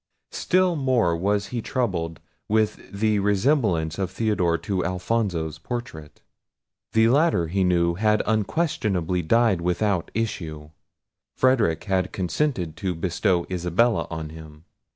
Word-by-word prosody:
Still 185 Hz, -1 st, +2 dB
more 125 Hz, -, +2 dB
was 100 Hz, +3 st, 0 dB
he 120 Hz, -2 st, -3 dB
troubled 90 Hz, -, -2 dB, 0.3 s
with 110 Hz, 0 st, 0 dB
the 105 Hz, +1 st, +1 dB
resemblance 100 Hz, -, +1 dB
of 95 Hz, -2 st, -1 dB
Theodore 95 Hz, -4 st, 0 dB
to 95 Hz, +3 st, -2 dB
Alfonso's 90 Hz, -3 st, -2 dB
portrait. 120 Hz, -, -7 dB, 0.7 s
The 110 Hz, 0 st, +5 dB
latter 140 Hz, -, +2 dB
he 95 Hz, +2 st, +1 dB
knew 85 Hz, -1 st, +2 dB
had 105 Hz, +3 st, +2 dB
unquestionably 105 Hz, -, 0 dB
died 110 Hz, +1 st, +2 dB
without 90 Hz, +1 st, 0 dB
issue. 80 Hz, -9 st, -4 dB, 0.6 s
Frederic 115 Hz, -11 st, +2 dB
had 95 Hz, -3 st, 0 dB
consented 90 Hz, -, -1 dB
to 90 Hz, 0 st, -2 dB
bestow 85 Hz, +1 st, 0 dB
Isabella 90 Hz, +6 st, +1 dB
on 80 Hz, -2 st, -5 dB
him. 80 Hz, 0 st, -12 dB
95 Hz, 120 wpm, -24 LUFS, 85-110 Hz, 0.7 s, The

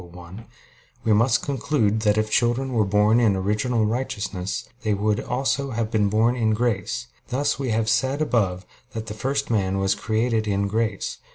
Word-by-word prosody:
1), 90 Hz, +5 st, -11 dB, 0.6 s
we 110 Hz, -, +3 dB
must 115 Hz, +3 st, +3 dB
conclude 130 Hz, -6 st, 0 dB
that 105 Hz, -1 st, +2 dB
if 110 Hz, 0 st, 0 dB
children 125 Hz, +4 st, +1 dB
were 110 Hz, -3 st, +3 dB
born 105 Hz, +3 st, +3 dB
in 110 Hz, -5 st, +3 dB
original 105 Hz, +4 st, 0 dB
righteousness, 100 Hz, -5 st, -3 dB
they 110 Hz, -3 st, 0 dB
would 105 Hz, +1 st, 0 dB
also 135 Hz, +2 st, -1 dB
have 115 Hz, -2 st, -2 dB
been 105 Hz, -3 st, +2 dB
born 110 Hz, +4 st, +2 dB
in 110 Hz, -3 st, +1 dB
grace; 110 Hz, -, -1 dB, 0.2 s
thus 135 Hz, +2 st, -1 dB
we 135 Hz, -2 st, -2 dB
have 110 Hz, 0 st, 0 dB
said 135 Hz, +5 st, +1 dB
above 100 Hz, -11 st, 0 dB, 0.3 s
that 110 Hz, -2 st, -5 dB
the 105 Hz, -, -6 dB
first 135 Hz, +4 st, -2 dB
man 95 Hz, -3 st, +1 dB
was 95 Hz, 0 st, +2 dB
created 110 Hz, 0 st, 0 dB
in 100 Hz, -1 st, 0 dB
grace 110 Hz, -1 st, -2 dB
(Q. -, -, -31 dB
110 Hz, 180 wpm, -23 LUFS, 105-120 Hz, 0.6 s, we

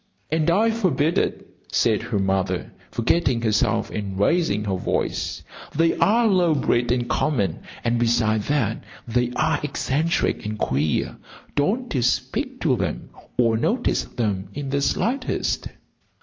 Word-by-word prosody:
"And 160 Hz, 0 st, +2 dB
I 215 Hz, +7 st, +4 dB
forbid 175 Hz, -8 st, +1 dB
it," -, -, -2 dB, 0.2 s
said 110 Hz, -3 st, +2 dB
her 115 Hz, -2 st, -2 dB
mother, 95 Hz, -2 st, -1 dB, 0.2 s
forgetting 120 Hz, 0 st, +1 dB
herself 110 Hz, 0 st, +1 dB
and 100 Hz, -2 st, -4 dB
raising 105 Hz, -, +2 dB
her 100 Hz, -2 st, -1 dB
voice. 95 Hz, -, -2 dB, 0.3 s
"They 165 Hz, +2 st, +3 dB
are 230 Hz, +3 st, +4 dB
low 180 Hz, -6 st, +3 dB
bred 120 Hz, -3 st, +1 dB
and 120 Hz, -1 st, 0 dB
common. 100 Hz, -, 0 dB, 0.2 s
And 120 Hz, 0 st, +1 dB
beside 115 Hz, -2 st, +2 dB
that, 125 Hz, -7 st, 0 dB, 0.2 s
they 120 Hz, +1 st, +1 dB
are 155 Hz, -2 st, +1 dB
eccentric 150 Hz, +3 st, 0 dB
and 105 Hz, 0 st, -4 dB
queer. 75 Hz, -3 st, 0 dB, 0.4 s
Don't 225 Hz, -, 0 dB
you 130 Hz, -, +1 dB
speak 130 Hz, -, -1 dB
to 140 Hz, -7 st, +3 dB
them 95 Hz, -8 st, -3 dB, 0.3 s
or 115 Hz, -2 st, +3 dB
notice 235 Hz, -, +1 dB
them 100 Hz, -5 st, -2 dB
in 140 Hz, -1 st, -4 dB
the 140 Hz, 0 st, +1 dB
slightest." 255 Hz, -, 0 dB
125 Hz, 140 wpm, -23 LUFS, 110-165 Hz, 0.4 s, I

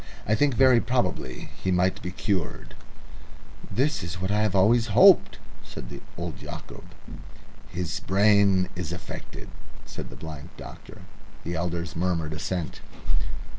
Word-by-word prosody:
I 105 Hz, -, +2 dB
think 140 Hz, +3 st, +3 dB
very 130 Hz, -1 st, +6 dB
probably 120 Hz, -, -2 dB
he 95 Hz, -, 0 dB
might 90 Hz, +1 st, +2 dB
be 90 Hz, -, -4 dB
cured." 95 Hz, -2 st, -2 dB, 1.0 s
"That 145 Hz, +2 st, +1 dB
is 85 Hz, +1 st, -5 dB
what 95 Hz, +2 st, -1 dB
I 105 Hz, +1 st, +2 dB
have 105 Hz, -3 st, +1 dB
always 115 Hz, +5 st, +4 dB
hoped," 195 Hz, -3 st, +7 dB, 0.3 s
said -, -, -9 dB, 0.2 s
old -, -, -5 dB
Yacob. -, -, -9 dB, 0.9 s
"His 85 Hz, -1 st, -3 dB
brain 100 Hz, -1 st, +4 dB
is 90 Hz, -3 st, -4 dB
affected," 85 Hz, -, -8 dB, 0.4 s
said -, -, -7 dB
the -, -, -10 dB
blind 75 Hz, -3 st, -8 dB
doctor. -, -, -11 dB, 0.4 s
The 85 Hz, -, -3 dB
elders 85 Hz, 0 st, -3 dB
murmured 85 Hz, -2 st, 0 dB
assent. 85 Hz, +2 st, -3 dB
95 Hz, 135 wpm, -26 LUFS, 85-110 Hz, 1.0 s, hoped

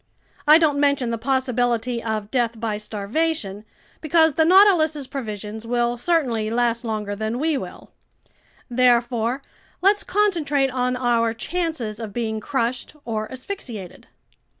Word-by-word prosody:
I 305 Hz, +1 st, +9 dB
don't 300 Hz, -4 st, +2 dB
mention 280 Hz, -4 st, +2 dB
the 230 Hz, -, -2 dB
possibility 245 Hz, -2 st, 0 dB
of 215 Hz, -2 st, -3 dB
death 235 Hz, -3 st, 0 dB
by 220 Hz, -2 st, -2 dB
starvation 210 Hz, +1 st, -2 dB, 0.4 s
because 320 Hz, 0 st, +3 dB
the 320 Hz, -, +3 dB
Nautilus's 335 Hz, -6 st, +5 dB
provisions 220 Hz, -4 st, -6 dB
will 240 Hz, 0 st, +1 dB
certainly 245 Hz, -7 st, 0 dB
last 235 Hz, 0 st, 0 dB
longer 215 Hz, -3 st, -3 dB
than 220 Hz, +3 st, -3 dB
we 310 Hz, +3 st, +1 dB
will. 265 Hz, -, -7 dB, 0.8 s
Therefore, 245 Hz, 0 st, +2 dB, 0.4 s
let's 405 Hz, +2 st, +3 dB
concentrate 315 Hz, -10 st, +1 dB
on 250 Hz, 0 st, 0 dB
our 235 Hz, -2 st, +1 dB
chances 315 Hz, -6 st, -3 dB
of 220 Hz, -3 st, -6 dB
being 220 Hz, -2 st, -2 dB
crushed 250 Hz, +4 st, -2 dB
or 215 Hz, -2 st, -3 dB
asphyxiated." 255 Hz, -, -7 dB
245 Hz, 125 wpm, -22 LUFS, 225-290 Hz, 0.8 s, I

